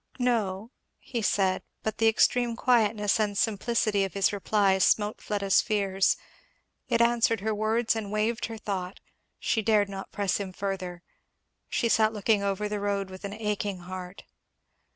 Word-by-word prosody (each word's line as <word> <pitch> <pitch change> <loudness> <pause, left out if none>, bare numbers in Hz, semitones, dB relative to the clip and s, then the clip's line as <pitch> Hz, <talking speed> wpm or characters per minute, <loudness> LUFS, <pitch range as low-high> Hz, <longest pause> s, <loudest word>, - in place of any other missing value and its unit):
"No," 225 -4 -1 0.3
he 235 -3 -5
said; 190 -3 +1 0.2
but 220 -1 -3
the 225 - +4
extreme 235 +1 +3
quietness 220 -4 +2
and 205 -2 0
simplicity 215 -1 +1
of 195 -1 -4
his 195 +1 +2
reply 200 -1 +2
smote 205 +4 +2
Fleda's 200 -2 +2
fears; 195 -3 +1 0.7
it 235 -1 +2
answered 235 -2 +3
her 220 +1 -1
words 220 +2 +1
and 210 -3 -4
waived 215 +2 0
her 225 -1 -7
thought; 195 -3 -4 0.4
she 220 - 0
dared 210 -2 +2
not 195 -1 -7
press 200 -2 0
him 195 -2 -5
further. 185 -3 -4 0.7
She 235 - +1
sat 220 -1 +3
looking 210 0 +1
over 200 +1 -1
the 210 0 -3
road 200 -1 -2
with 185 +1 -10
an 200 - -5
aching 210 -3 -3
heart. 180 +1 -8
205 Hz, 155 wpm, -27 LUFS, 195-220 Hz, 0.7 s, the